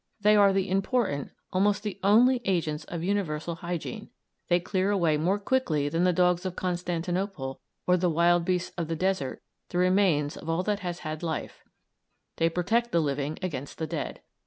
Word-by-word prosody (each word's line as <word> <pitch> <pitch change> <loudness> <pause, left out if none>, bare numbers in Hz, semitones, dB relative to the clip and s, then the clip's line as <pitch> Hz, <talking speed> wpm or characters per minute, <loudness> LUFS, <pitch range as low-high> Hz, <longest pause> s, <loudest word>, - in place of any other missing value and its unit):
They 210 +1 +5
are 200 -1 +6
the 195 0 +1
important, 195 - 0 0.2
almost 200 +2 +2
the 210 -2 -4
only, 240 +5 +5
agents 160 -5 -1
of 170 -1 -5
universal 175 -4 -1
hygiene; 180 +6 -5 0.4
they 175 0 +3
clear 185 +2 0
away 170 -6 +2
more 175 +7 +1
quickly 200 - 0
than 165 +3 +1
the 180 - +4
dogs 180 0 +2
of 185 -2 -4
Constantinople 175 -4 -2 0.3
or 180 0 +4
the 180 0 +1
wild 170 +1 +3
beasts 180 0 -1
of 165 - -1
the 165 - -2
desert 185 -6 -1 0.3
the - - -3
remains 180 -5 +3
of - - -8
all 165 +3 +1
that 205 +1 0
has 175 -3 -5
had 155 0 -4
life; 160 -3 -4 0.8
they 165 - +3
protect 220 +8 0
the 170 - +3
living 145 0 -1
against 145 -6 -4
the 160 - -2
dead. - - -4
180 Hz, 180 wpm, -27 LUFS, 165-195 Hz, 0.8 s, are